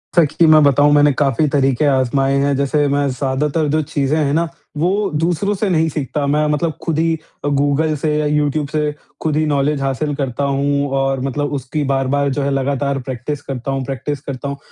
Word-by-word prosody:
सच्ची 165 0 +4
मैं 155 -1 +7
बताऊँ, 145 +1 +4
मैंने 145 0 +5
काफ़ी 145 +3 +1
तरीके 135 0 +2
आज़माए 135 0 +2
हैं। 140 0 +1
जैसे, 145 +1 +1
मैं 140 0 +1
ज़्यादातर 140 +4 -1
जो 155 +2 +1
चीज़ें 145 0 -1
हैं 145 -2 +1
ना, 165 +2 +1 0.3
वो 195 +6 +1
दूसरों 175 +6 0
से 205 +2 -1
नहीं 165 -2 +2
सीखता, 145 -1 -3
मैं 150 +2 +2
मतलब 160 +2 -1
खुद 165 -3 -1
ही 165 0 +2 0.3
अ, - - +1
गूगल 145 +2 +1
से 150 +1 -1
या 150 - 0
यूट्यूब 150 0 0
से 150 0 -1 0.3
खुद 155 -2 0
ही 155 - +2
नॉलेज 145 0 0
हासिल 135 +2 -1
करता 135 -1 -3
हूँ 140 +1 0
और 135 0 0
मतलब 145 +2 -2
उसकी 140 +2 -3
बार-बार 135 +1 +1
जो 140 +2 -2
है, 140 - 0
लगातार 140 +1 -1
प्रैक्टिस 130 +3 -5
करता 135 -2 -5
हूँ 135 0 -2
प्रैक्टिस 140 +2 -4
करता 140 -1 -6
हूँ। 140 - -5
145 Hz, 200 wpm, -18 LUFS, 135-150 Hz, 0.3 s, मैं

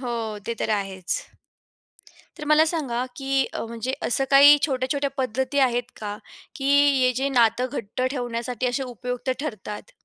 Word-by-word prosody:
हो, 245 -2 -3 0.3
ते 235 - -2
तर - - -1
आहेच. 190 -2 -3 1.2
तर 300 - -7
मला 310 +1 +6
सांगा 270 -7 -2
की 270 -1 0
अ, - - -3
म्हणजे 235 +3 -4
असं 270 - +1
काही 285 +2 +9
छोट्या-छोट्या 275 0 -1
पद्धती 265 +2 -1
आहेत 245 0 -3
का 210 -1 -5 0.4
की 270 - -5 0.3
हे 255 0 +4
जे 270 +3 -1
नातं 245 -1 +3
घट्ट 235 -3 -5
ठेवण्यासाठी 245 -2 -3
असे 250 +2 -1
उपयुक्त 250 +1 -5
ठरतात? 220 - -6
255 Hz, 150 wpm, -24 LUFS, 235-275 Hz, 1.2 s, काही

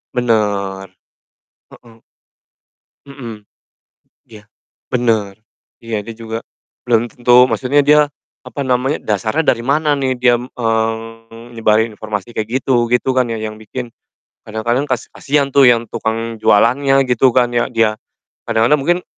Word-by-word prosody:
Benar. 100 -5 -1 0.8
Heeh. 115 -1 -18 1.1
Mhm. 120 -7 -10 0.8
Iya, 105 -2 -14 0.5
benar. 110 -5 0 0.5
Iya, 110 -3 -4
dia 115 - -7
juga 115 0 -6 0.5
belum 120 -1 +1
tentu 125 +1 +4
maksudnya 140 +3 +2
dia, 150 +1 +5 0.5
apa 140 - -6
namanya, 130 +3 0
dasarnya 110 - -1
dari 115 - -8
mana 145 +2 +1
nih 135 -2 0
diam, 120 -1 +2
eee, 115 0 -3
nyebarin 110 0 +2
informasi 105 +1 -6
kayak 110 0 -3
gitu, 120 -3 +2
gitu 125 +2 +1
kan 125 -2 +2
ya, 115 - -3
yang 110 0 -5
bikin 120 +3 -7 0.6
kadang-kadang 120 +5 -1
kas 120 -3 -1
kasihan 140 0 0
tuh 140 - +6
yang 115 -1 +1
tukang 115 0 -3
jualannya, 135 +5 +3
gitu 125 +1 +3
kan 120 -1 +3
ya, 120 - +1
dia. 115 -3 +2 0.5
Kadang 115 0 +2
mungkin 175 +5 0
115 Hz, 130 wpm, -17 LUFS, 110-125 Hz, 1.1 s, tuh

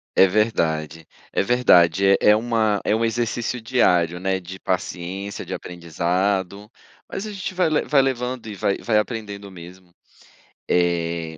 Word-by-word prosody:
É 95 - +7
verdade, 80 -7 -1 0.2
é - - +1
verdade, 95 -5 +4
é 100 - +5
é 105 - +6
uma 110 -2 +1
é 105 - +2
um 115 - 0
exercício 120 +1 -1
diário, 90 -8 +2
né, 95 0 -1
de 95 +2 -10
paciência, 95 +2 -4
de - - -5
aprendizado, 90 +4 -2 0.4
mas 195 - -5
a 215 - -6
gente 190 -1 -6
vai 180 -2 +2
le 155 -1 +1
vai 145 -2 +2
levando 125 -2 -2
e 105 - -6
vai 100 0 -1
vai 110 -3 +1
aprendendo 105 -3 -5
mesmo. 90 0 -13 0.8
Eh. 85 -2 0
100 Hz, 155 wpm, -22 LUFS, 90-115 Hz, 0.8 s, É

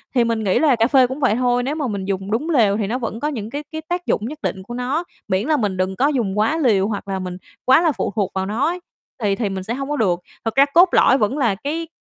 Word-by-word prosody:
thì 240 - +4
mình 230 -1 -1
nghĩ 190 - +2
là 295 -5 +4
cà 230 0 +2
phê 260 -2 +5
cũng 260 +3 -6
vậy 255 -6 +2
thôi, 245 0 +1
nếu 280 +4 -2
mà 295 -5 -2
mình 200 -3 -4
dùng 195 +1 -3
đúng 285 +9 -1
lều 220 -9 +3
thì 205 -3 -1
nó 240 - -1
vẫn 230 -2 -4
có 295 - -1
những 225 -7 -4
cái 290 +3 -5
cái 315 0 -5
tác 355 0 -2
dụng 210 - 0
nhất 295 +5 -6
định 190 -1 -3
của 240 - -8
nó, 260 +7 -1 0.2
miễn 190 +5 0
là 310 -1 +3
mình 200 -5 -1
đừng 185 +1 -1
có 275 +6 +2
dùng 225 -9 -1
quá 225 +10 +2
liều 210 -10 +2
hoặc 205 -2 -4
là 190 -1 -2
mình 180 -1 -5 0.3
quá 265 +5 +6
là 330 -3 +3
phụ 245 - -3
thuộc 195 -3 0
vào 190 0 -1
nó 225 +9 0
ấy, 355 +2 -2 0.4
thì 200 -1 +2
thì 215 -3 -2
mình 190 -1 -4
sẽ 230 - -3
hông 275 +2 -4
có 295 - 0
được. 180 -7 +1 0.3
Thực 225 - -2
ra 275 +1 +6
cốt 350 +2 +7
lõi 260 - +5
vẫn 235 +6 0
là 235 -8 +2
cái, 315 +9 -4
235 Hz, 300 wpm, -20 LUFS, 200-285 Hz, 0.4 s, cốt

